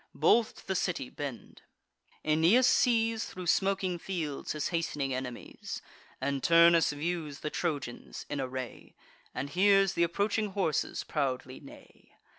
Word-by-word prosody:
Both 230 -1 +3
to - - -16
the 190 - 0
city 175 -8 -2
bend. 140 -5 -7 0.6
Aeneas 165 +11 +4
sees, 230 -2 +3
Thro' 180 -1 -8
smoking 190 0 +1
fields, 165 -7 -4
his 150 -1 -2
hast'ning 150 -6 -1
enemies; 125 -1 -6 0.4
And 140 0 -1
Turnus 170 0 +6
views 155 -1 -4
the 150 - -3
Trojans 140 - -4
in 140 - -3
array, 130 -1 -6 0.4
And 140 +2 -4
hears 195 +1 +4
th' - - -6
approaching 200 +4 +1
horses 185 -6 -1
proudly 130 -3 -2
neigh. 140 - -16
165 Hz, 130 wpm, -30 LUFS, 140-190 Hz, 0.6 s, Turnus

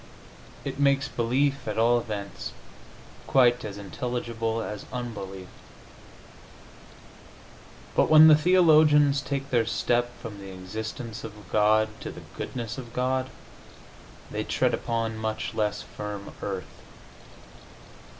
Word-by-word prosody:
It 135 0 -4
makes 140 0 +3
belief, 135 +2 0
at 105 - -3
all 120 +2 +4
events, 105 -4 -6 0.7
quite 125 -2 +4
as 100 -2 -6
intelligible 115 +2 -3
as 105 -1 -6
unbelief. 100 -7 -6 2.5
But - - +3
when 155 0 +9
the 155 - +9
theologians 150 -4 +5
take 140 -1 -4
their 115 -3 +2
step 120 +1 +1
from 105 -3 -8
the 95 -1 -9
existence 110 +4 -6
of 110 - -7 0.2
God 110 +1 +4
to - - -6
the - - -11
goodness 120 -1 -5
of 120 -2 -10
God 130 +1 0 1.0
they - - -2
tread - - +1
upon 115 -2 -2
much 110 0 -3
less 105 -1 -1
firm 105 -1 -7
earth. 95 -2 -6
115 Hz, 115 wpm, -27 LUFS, 105-135 Hz, 2.5 s, when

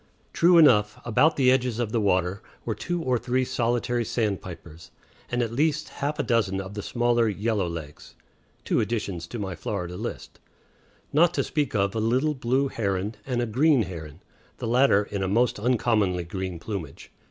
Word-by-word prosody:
True 175 +1 +5
enough, 105 -10 +5
about 145 +7 +3
the 130 -2 +4
edges 125 -3 +1
of 120 -3 -2
the 115 - +1
water 95 -1 +1 0.2
were - - -1
two 175 -1 -3
or 125 -4 +1
three 130 +2 0
solitary 120 -1 0
sandpipers, 90 -7 -4 0.4
and 120 0 0
at 115 - -3
least 150 +3 0
half 145 +2 -3
a 145 - 0
dozen 105 -7 +1
of 95 +1 -6
the 105 - -4
smaller 120 +1 +1
yellowlegs, 90 -8 -3 0.5
two - - +1
additions 100 -6 -2
to 120 - -6
my 95 -4 -4
Florida 90 -2 -4
list, - - -7 0.7
not 170 +3 +4
to - - +1
speak 145 -6 -2
of 100 -1 +1
a 110 - -2
little 130 +7 +1
blue 130 +1 0
heron 100 -3 -2
and 120 -2 0
a - - 0
green 130 +3 +3
heron, 80 -3 -8 0.4
the - - -5
latter 120 -3 +4
in 100 -2 -3
most 120 +1 +2
uncommonly 105 -6 +1
green 95 +1 -5
plumage. 85 -5 -7
115 Hz, 170 wpm, -25 LUFS, 95-125 Hz, 0.7 s, True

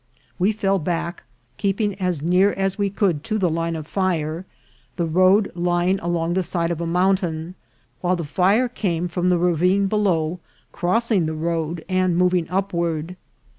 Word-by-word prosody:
We 190 +4 +3
fell 195 -2 0
back, 170 +1 -3 0.4
keeping 200 +4 0
as 180 -5 -1
near 185 +4 +3
as 195 0 -1
we 200 -1 +1
could 185 -7 0
to 215 -1 -1
the 180 -5 +1
line 165 +1 -1
of 155 -2 -5
fire, 170 -1 -2 0.5
the 170 - -1
road 185 +5 +3
lying 175 +2 +1
along 170 -1 -1
the 190 - +1
side 170 -1 -1
of 170 -1 -3
a 170 - -2
mountain; 180 -2 0 0.5
while 180 +4 +1
the 170 - -4
fire 195 - +2
came 180 -8 -2
from 180 +1 0
the 180 - +3
ravine 180 +3 +2
below, 180 -5 0 0.3
crossing 195 -1 +1
the 160 - -3
road, 165 0 -2
and 185 -2 +1
moving 180 -2 +2
upward. 170 -3 -2
180 Hz, 165 wpm, -22 LUFS, 165-195 Hz, 0.5 s, We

